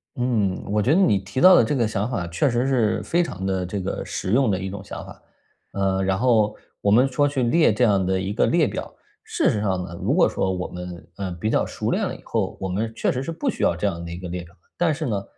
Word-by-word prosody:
嗯， 115 -8 0
我 105 0 +2
觉 130 +8 +3
得 185 - +4
你 165 - +4
提 100 +5 -5
到 185 +3 +8
的 - - +6
这 115 +6 0
个 120 -4 +2
想 105 +1 -2
法 100 -9 -2
确 85 +11 +1
实 120 +2 0
是 115 -5 +1
非 170 - +1
常 95 - -5
地 95 -1 -1
这 100 +3 -4
个 95 +1 -3
实 95 - -4
用 125 0 +3
的 95 - 0
一 95 0 -4
种 95 0 -7
想 - - -8
法， - - -13 0.5
呃， 95 -1 0
然 95 0 +1
后 110 -2 +2 0.3
我 100 - +1
们 125 +6 +5
说 145 +2 +1
去 140 -3 -1
列 155 +4 +4
这 125 - +1
样 100 -5 +3
的 95 0 +1
一 95 +2 -3
个 110 - +2
列 165 -3 +3
表。 - - -6 0.4
事 - - +2
实 105 - -1
上 95 -3 0
呢， 85 -1 -8
如 - - +1
果 - - +5
说 95 - -1
我 90 -1 -3
们， 90 -1 -8
呃， 95 -2 -3
比 90 +6 -3
较 - - +2
熟 - - -3
练 - - 0
了 - - -5
以 - - -13
后， - - -2
我 95 - -3
们 105 +5 -2
确 - - +1
实 130 - -2
是 135 - -4
不 220 - -4
需 245 - -1
要 85 - +3
这 90 +4 -3
样 85 -4 -2
的 85 - -7
一 85 - -6
个 90 0 -7
列 90 0 -5
表。 85 0 -17 0.2
但 175 -2 +2
是 155 +1 -3
呢， 100 -6 -2
105 Hz, 300 characters per minute, -23 LUFS, 95-125 Hz, 0.5 s, 到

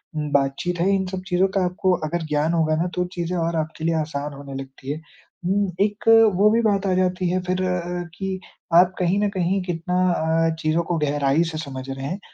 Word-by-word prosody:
उम, 150 -1 -2
बातचीत 140 +6 0
है, 180 +3 +2
इन 190 -1 0
सब 185 0 -4
चीज़ों 185 0 +3
का 190 - +3
आपको 185 +1 0 0.2
अगर 170 0 -2
ज्ञान 150 +3 +1
होगा 160 -2 +2
ना 180 - -1
तो 180 - 0
चीज़ें 175 +1 -2
और 165 0 -1
आपके 160 0 -4
लिए 165 - +2
आसान 150 -1 -4
होने 140 0 -9
लगती 135 0 -8
हैं। 155 +2 -5 0.4
उम, 195 +1 +1
एक 205 +1 -3 0.3
वो 205 +3 +5
भी 230 +1 +3
बात 200 -2 +2
आ 185 - +2
जाती 185 -1 +1
है 185 +1 +1
फिर 185 +1 -1
अ, 180 -1 -2
कि 190 -1 -3 0.4
आप 180 +2 +6
कहीं 180 +3 +2
न 205 - +2
कहीं 190 0 0
कितना 180 0 -3 0.2
अ, 165 0 +1
चीज़ों 155 +2 +1
को 170 0 -1
गहराई 145 +1 +2
से 155 - -5
समझ 135 -3 -6
रहे 135 0 -5
हैं। 185 +7 -4
175 Hz, 220 wpm, -23 LUFS, 155-185 Hz, 0.4 s, आप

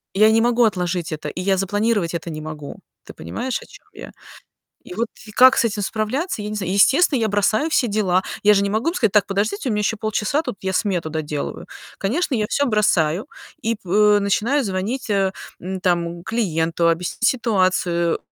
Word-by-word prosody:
Я 215 +2 +6
не 225 +1 +4
могу 240 +1 +3
отложить 180 -5 -1
это, 155 -1 -5
и 170 - -5
я 190 +1 +1
запланировать 205 -1 0
это 170 0 -4
не 155 -1 -6
могу. 155 -2 -8 0.3
Ты - - -12
понимаешь, 160 - -4
о - - -12
чём - - -17
я? - - -10 0.7
И 360 - -10
вот 235 - -1 0.2
и - - -10
как 260 +4 +6
с - - +4
этим 210 -1 -4
справляться, 220 - -2
я 210 - -5
не 215 - -4
знаю. 190 -3 -2
Естественно, 270 - +4
я 220 - +2
бросаю 210 +9 +1
все 260 -6 +2
дела. 200 -4 +1 0.2
Я 210 +1 +6
же 200 - +3
не 200 - -1
могу 220 +8 -1
им - - -4
сказать: 225 - +1
"Так, 210 - +4
подождите, 200 +4 -2
у - - 0
меня 210 - 0
ещё 210 +2 0
полчаса, 215 +6 -1
тут 250 -9 -6
я 190 0 -2
смету 180 -5 -1
доделываю". 150 -2 -4 0.3
Конечно, 265 - -1
я 215 - 0
всё 285 - +1
бросаю 190 -5 +1 0.4
и 230 +1 +1
п 205 +3 +4
начинаю 225 +8 +1
звонить, 215 +5 -3
э, 195 -2 +1 0.3
м, 185 +1 -5
там, 175 -2 -1
клиенту, 170 -7 -1
объяснить 170 +7 -2
ситуацию, 185 -7 +1
205 Hz, 200 wpm, -21 LUFS, 180-225 Hz, 0.7 s, Я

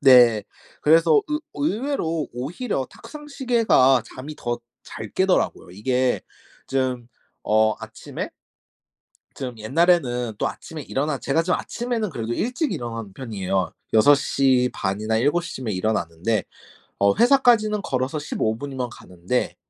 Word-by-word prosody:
네. 120 -5 +7 0.4
그래서 160 0 +5
의 300 0 -1
의외로 220 - -1
오히려 135 - -3
탁상 295 -1 -11
시계가 230 - +3
잠이 140 +4 -7
더 120 -4 -3 0.3
잘 - - -7
깨더라고요. 190 - +1
이게 125 +6 0 0.5
좀 130 -3 -1 0.4
어 110 0 +4
아침에 - - -7 1.0
좀 125 -4 -6
옛날에는 125 -2 +2
또 - - +1
아침에 155 -2 -8
일어나 140 +1 -1
제가 140 +6 +1
좀 180 +2 +1
아침에는 235 -4 -3
그래도 115 -5 -4
일찍 250 - -1
일어나는 115 -4 -5
편이에요. 95 -6 -2 0.2
6:30 125 -5 +3
이나 110 +1 0
7:00 150 +9 0
쯤에 120 -5 -3
일어나는데 95 0 -1 0.5
어 100 0 +4
회사까지는 235 -5 +4
걸어서 130 +3 -1
15 110 -7 -1
분이면 130 -1 -4
가는데 90 +3 -3
130 Hz, 270 characters per minute, -23 LUFS, 115-170 Hz, 1.0 s, 네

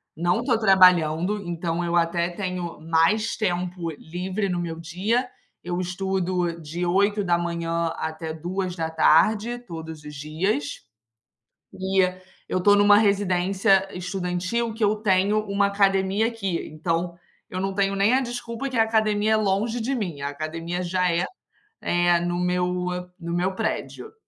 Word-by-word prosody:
não 175 +6 +1
estou 245 0 +2
trabalhando 185 -1 +4
então 170 -1 -2
eu 175 0 -1
até 170 +1 +1
tenho 180 -2 -4
mais 165 +8 +2
tempo 180 -3 -2
livre 185 +6 -4
no 175 -1 -1
meu 165 -1 -4
dia. 200 +10 -1 0.4
Eu 175 +1 -3
estudo 180 -2 -2
de 165 +3 -4
8h 175 -3 +1
até 160 0 -4
14h 180 +5 +1
todos 160 -9 -9
os 150 0 -9
dias. 155 +2 -2 0.9
E 190 0 +1 0.5
eu 185 - 0
estou 205 +2 +5
em 205 - +5
uma 205 0 +7
residência 195 -1 +2
estudantil 185 +5 -2
que 225 - -3
eu 210 +1 +3
tenho 205 0 +2
uma 200 0 +1
academia 195 +1 +2
aqui. 195 -7 -3
Então 165 +2 -2 0.3
eu 185 - -4
não 195 0 -1
tenho 195 0 +1
nem 200 +4 +3
a 265 - +4
desculpa 245 +1 -4
que 255 - -3
a 225 - +6
academia 215 -1 +1
é - - +5
longe 215 +3 0
de 265 +4 -1
mim, 175 - -4
a 140 - -2
academia 165 +4 -4
já 180 0 +1
é, 170 +1 +1 0.6
eh, 175 0 +2
no 175 0 -1
meu 180 0 +1 0.5
no 170 -2 -5
meu 180 +2 0
prédio. 225 - -4
180 Hz, 145 wpm, -24 LUFS, 170-205 Hz, 0.9 s, uma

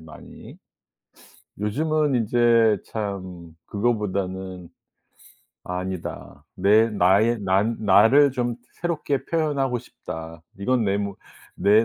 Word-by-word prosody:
많이. 80 -1 -13 1.0
요즘은 150 +7 0
인제 115 -2 +3
참 95 -6 -6
그거보다는. 95 -5 -2 1.0
"아니다. 90 -6 -6
내 110 +3 +4
나의 105 +3 +3
난 100 +4 +1
나를 110 +8 +5
좀 120 -2 -1 0.3
새롭게 155 -5 -2
표현하고 140 -6 0
싶다. 80 -8 -9 0.2
이건 120 +3 +1
내 100 0 +1
뭐 100 -1 -4 0.4
내 105 +3 +5
105 Hz, 185 characters per minute, -23 LUFS, 95-120 Hz, 1.0 s, 나를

